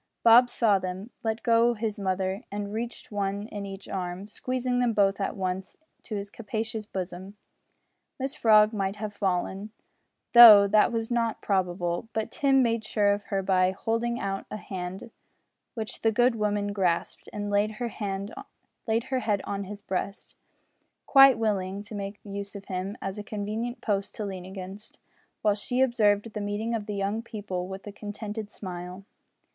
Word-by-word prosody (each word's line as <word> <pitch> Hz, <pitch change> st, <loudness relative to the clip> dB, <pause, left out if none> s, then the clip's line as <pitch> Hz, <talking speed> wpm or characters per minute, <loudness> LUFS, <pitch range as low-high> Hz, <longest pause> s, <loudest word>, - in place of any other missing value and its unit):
Bob 240 Hz, +2 st, +8 dB
saw 210 Hz, -6 st, +3 dB
them, 185 Hz, +4 st, -5 dB
let 225 Hz, 0 st, -2 dB
go 235 Hz, 0 st, +4 dB
his 215 Hz, -1 st, -3 dB
mother, 190 Hz, +1 st, -1 dB
and 205 Hz, 0 st, -4 dB
received 235 Hz, +1 st, -5 dB
one 200 Hz, 0 st, -2 dB
in 200 Hz, -1 st, -5 dB
each 195 Hz, 0 st, -8 dB
arm 185 Hz, +1 st, -4 dB
squeezing 250 Hz, +3 st, -2 dB
them 245 Hz, -2 st, +2 dB
both 200 Hz, -1 st, +2 dB
at -, -, -1 dB
once 185 Hz, 0 st, -3 dB, 0.2 s
to 215 Hz, -, -6 dB
his 200 Hz, 0 st, -5 dB
capacious 220 Hz, -1 st, -4 dB
bosom. 190 Hz, +1 st, -6 dB, 0.8 s
Mrs 270 Hz, +2 st, -3 dB
Frog 215 Hz, -4 st, +6 dB
might 195 Hz, -1 st, -1 dB
have 210 Hz, 0 st, -5 dB
fallen, 195 Hz, +1 st, -1 dB, 0.6 s
though 225 Hz, -4 st, +11 dB
that 210 Hz, +1 st, +4 dB
was 225 Hz, 0 st, -2 dB
not 230 Hz, -2 st, 0 dB
probable, 180 Hz, 0 st, -1 dB
but 220 Hz, 0 st, -2 dB
Tim 270 Hz, -2 st, +3 dB
made 230 Hz, -2 st, 0 dB
sure 205 Hz, -2 st, +2 dB
of 205 Hz, 0 st, -5 dB
her 195 Hz, -1 st, -1 dB
by 185 Hz, -1 st, +3 dB
holding 230 Hz, +5 st, -1 dB
out 195 Hz, 0 st, -3 dB
a -, -, -5 dB
hand 190 Hz, +1 st, -6 dB, 0.6 s
which 220 Hz, -2 st, -5 dB
the 225 Hz, -, +3 dB
good 245 Hz, +3 st, +3 dB
woman 205 Hz, -2 st, -1 dB
grasped, 180 Hz, -4 st, -1 dB
and 205 Hz, -1 st, -4 dB
laid 205 Hz, +1 st, +2 dB
her 235 Hz, +2 st, -3 dB
head 200 Hz, -1 st, -4 dB, 1.1 s
on 200 Hz, 0 st, -3 dB
his 205 Hz, +1 st, -9 dB
breast, 195 Hz, +2 st, -4 dB, 0.7 s
quite 270 Hz, -3 st, +8 dB
willing 200 Hz, -3 st, -1 dB
to 210 Hz, -, -12 dB
make 200 Hz, 0 st, -5 dB
use 200 Hz, 0 st, -6 dB
of 200 Hz, -1 st, -8 dB
him 190 Hz, +3 st, -4 dB
as 195 Hz, +2 st, -4 dB
a -, -, -5 dB
convenient 215 Hz, +4 st, -4 dB
post 200 Hz, -2 st, -1 dB
to 215 Hz, -, -3 dB
lean 190 Hz, -2 st, -6 dB
against, 190 Hz, +2 st, -9 dB, 0.5 s
while 210 Hz, -1 st, +4 dB
she 245 Hz, +5 st, -2 dB
observed 225 Hz, -4 st, +2 dB
the 210 Hz, -, -3 dB
meeting 205 Hz, +3 st, -2 dB
of 220 Hz, -2 st, -3 dB
the 210 Hz, -, -3 dB
young 200 Hz, +3 st, -1 dB
people 205 Hz, -5 st, -5 dB
with 190 Hz, +1 st, -8 dB
a 205 Hz, -, -6 dB
contented 210 Hz, +1 st, -6 dB
smile. 180 Hz, -1 st, -7 dB
205 Hz, 165 wpm, -27 LUFS, 195-225 Hz, 1.1 s, though